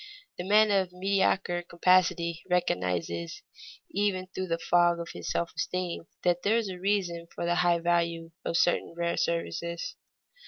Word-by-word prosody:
The - - -2
man 210 +1 +5
of 190 -2 +2
mediocre 190 -1 +1
capacity 170 -1 +2
recognizes 90 - -1 0.5
even 195 -2 0
through 185 0 -5
the 165 -1 0
fog 175 0 +3
of 170 - -5
his - - -6
self 170 - -1
esteem 180 -2 -3 0.2
that 175 0 +2
there 220 +3 +3
is 225 -4 -1
a 180 -1 -6
reason 180 -4 -1
for - - -3
the 175 - +2
high 175 0 +3
value 170 -1 0
of 165 - 0
certain 175 -1 +1
rare 170 0 0
services. 170 0 -2
175 Hz, 155 wpm, -28 LUFS, 170-185 Hz, 0.5 s, man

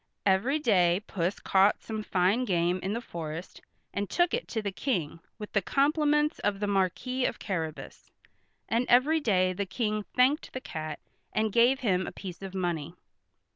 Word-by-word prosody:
Every 205 +9 +3
day 190 - +3
Puss 180 0 -2
caught 195 +2 +3
some 220 -1 -4
fine 195 +4 +1
game 180 -4 +1
in 195 +2 -2
the 235 - -2
forest 165 -4 -7 0.3
and 200 0 -2
took 350 0 +2
it 480 +1 -1
to 225 - -2
the 205 -2 -3
King 180 - -2 0.2
with 210 -2 -8
the 200 - +3
compliments 300 - +2
of 205 -1 -1
the 205 - -1
Marquis 205 +6 0
of - - -1
Carrabas, 160 -6 -5 0.6
and 235 +2 0
every 280 +7 +5
day 185 -9 +2
the 200 +1 -3
King 215 +2 -1
thanked 265 +5 +3
the 255 - -3
cat 155 -9 -5 0.4
and 215 -1 0
gave 245 +3 +4
him 185 -6 +1
a - - -4
piece 185 -2 -8
of 195 -1 -7
money. 175 -3 -2
200 Hz, 175 wpm, -29 LUFS, 180-250 Hz, 0.6 s, every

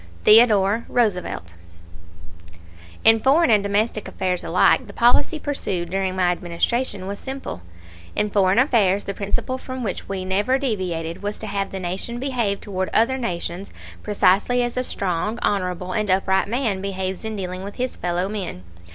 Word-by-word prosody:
THEODORE 215 -1 +5
ROOSEVELT. 180 - -1 1.5
In 225 0 +6
foreign 280 +5 +4
and 210 -2 +5
domestic 205 +2 0
affairs 185 -2 -2
alike 185 +8 +3
the 200 - -11
policy 245 +8 +3
pursued 195 - -3
during 190 -1 -1
my 180 -1 +2
Administration 185 +5 -1
was 200 +1 -5
simple. 265 - -6 0.5
In 210 - 0
foreign 195 0 +3
affairs 215 -7 +3
the 200 - -3
principle 205 +6 -2
from 255 -1 -6
which 195 -5 -4
we 190 -1 -3
never 205 +8 +1
deviated 180 -10 -3
was 205 +1 -3
to - - -7
have 200 -2 -2
the 195 - -5
Nation 185 +6 -4
behave 240 -7 -1
toward 190 -2 -3
other 250 +4 +3
nations 180 -3 -4 0.3
precisely 210 +4 +2
as 240 0 -2
a 255 - 0
strong, 200 0 -1
honorable, 180 -2 -1
and 215 +1 -1
upright 190 +1 +2
man 225 -4 -1
behaves 190 -1 -3
in 220 0 -4
dealing 185 -1 -5
with 200 +1 -7
his 255 +1 -2
fellow 175 +1 -1
men. 195 - -5
200 Hz, 160 wpm, -22 LUFS, 185-235 Hz, 1.5 s, In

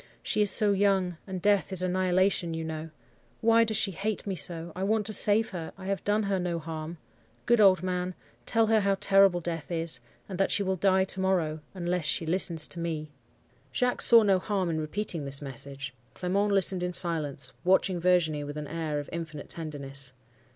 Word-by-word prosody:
She - - 0
is 205 - +4
so 210 -1 +7
young; 190 -3 +1
and 190 -1 -5
death 205 +1 +1
is 185 -1 +1
annihilation, 185 -1 0
you 165 - -4
know. 160 0 -6 0.5
Why 230 0 +4
does 220 -2 -1
she 195 - +1
hate 205 +4 -4
me 195 -2 -3
so? 170 0 -3
I 185 - -6
want 210 +2 0
to 215 - +1
save 215 +2 +6
her; 170 -4 -7
I 190 - -11
have 195 0 -3
done 210 +1 0
her 200 -1 -1
no 175 -1 -2
harm. 160 +1 -7 0.5
Good 240 -2 +3
old 185 -3 +5
man, 180 0 -3 0.3
tell 225 -1 +3
her 220 0 +3
how 195 -1 0
terrible 195 -2 +4
death 165 -2 -5
is; 165 -1 -1 0.3
and 190 -2 -7
that 195 - +2
she 200 - +1
will 190 0 -1
die 190 +1 +2
to 190 0 -2
morrow, 175 -5 0 0.2
unless 175 -2 -2
she 150 +3 0
listens 165 -2 +1
to 175 - -6
me.' 155 -3 -4 0.6
"Jacques 250 - -1
saw 230 -2 +8
no 195 -2 +2
harm 190 -3 -2
in 160 -1 -2
repeating 165 0 -3
this 140 0 0
message. 135 0 -5 0.2
Clement 200 +3 -1
listened 190 -2 +3
in 180 0 -3
silence, 150 -7 -1
watching 185 0 +2
Virginie 170 -4 +1
with 145 +1 -7
an 150 - -5
air 160 -1 -4
of 145 - -5
infinite 160 -3 -7
tenderness. 140 -5 -5
180 Hz, 200 wpm, -27 LUFS, 160-195 Hz, 0.6 s, saw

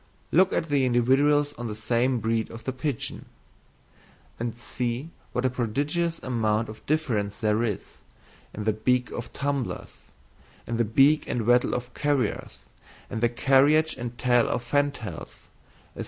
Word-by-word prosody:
Look 185 +3 +5
at 165 - -1
the 140 -2 +2
individuals 135 +4 +3
of 120 -2 -6
the 105 - -5
same 120 +3 +1
breed 110 +1 0
of 115 0 -10
the 130 - -3
pigeon; 130 -1 -3 1.1
and 115 -1 -3
see 125 +5 -4 0.2
what 125 - -1
a - - +4
prodigious 145 +8 -1
amount 115 -3 0
of 110 0 -10
difference 115 -10 0
there 110 0 +1
is 110 -5 -3 0.5
in 105 - -6
the 110 0 +2
beak 125 +3 +1
of 120 - -6
tumblers, 140 -3 -3 0.7
in 115 - -3
the 120 - +2
beak 135 +8 +4
and 115 -3 -1
wattle 120 +1 +3
of 125 0 -5
carriers, 145 -6 -1 0.5
in - - -2
the 120 +1 +3
carriage 140 +6 +3
and 120 -1 -6
tail 120 -1 +3
of 120 - -1
fantails, 145 -3 -3 0.5
&c. - - -12
125 Hz, 155 wpm, -26 LUFS, 115-140 Hz, 1.1 s, Look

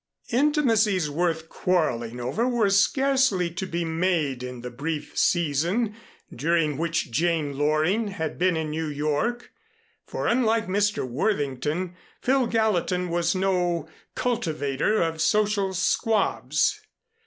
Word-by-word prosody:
Intimacies 225 - +2
worth 165 0 -1
quarreling 125 -11 -1
over 135 - -1
were 235 -5 +2
scarcely 260 -4 +2
to 190 +3 -4
be 170 -1 -2
made 160 -6 0
in 125 -1 -6
the 125 0 -6
brief 150 +4 -4
season 175 - +1 0.4
during 155 +2 +1
which 165 -3 -1
Jane 155 0 0
Loring 155 +9 +1
had 160 -7 -4
been 180 -1 +2
in 155 -1 -2
New 160 +1 -2
York, 150 +12 -2 0.6
for - - -4
unlike 230 -2 +2
Mr. 205 - 0
Worthington, 150 - -1 0.3
Phil 260 -1 +2
Gallatin 190 -5 0
was 170 +1 0
no 180 -4 0 0.3
cultivator 170 - 0
of 165 -1 -2
social 210 0 +2
squabs. 190 - +1
175 Hz, 120 wpm, -25 LUFS, 150-210 Hz, 0.6 s, Intimacies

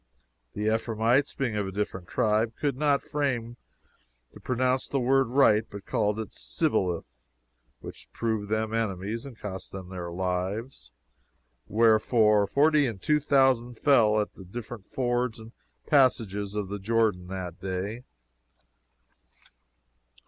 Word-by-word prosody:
The 105 - -4
Ephraimites, 115 +4 +1
being 125 -6 -1
of 105 -2 -1
a - - -5
different 95 -3 -4
tribe, 110 +2 +1
could 145 -3 0
not 145 0 +1
frame 125 -5 -2 0.8
to - - -12
pronounce 130 +1 0
the 140 - -1
word 135 +1 +3
right, 115 -4 +4
but 100 -1 -9
called 105 0 0
it 110 - -5
Sibboleth, 85 +7 -1 0.7
which - - -11
proved 110 -3 -2
them 110 0 -1
enemies 110 +2 -2
and 125 -5 -11
cost 95 -3 -7
them 95 -2 -8
their 90 -2 -6
lives; 95 +7 -3 0.8
wherefore, 110 -1 +4
forty 150 +2 +3
and 110 -5 -5
two 150 +10 +2
thousand 130 -5 +2
fell 110 -7 +4
at 105 - -2
the 95 - -12
different 110 +2 -8
fords 120 -2 -1
and 110 0 -12 0.3
passages 105 -8 +2
of 105 -2 -3
the 100 0 -4
Jordan 105 -3 +1
that 90 -2 -6
day." 95 +5 -4
110 Hz, 135 wpm, -27 LUFS, 100-125 Hz, 0.8 s, right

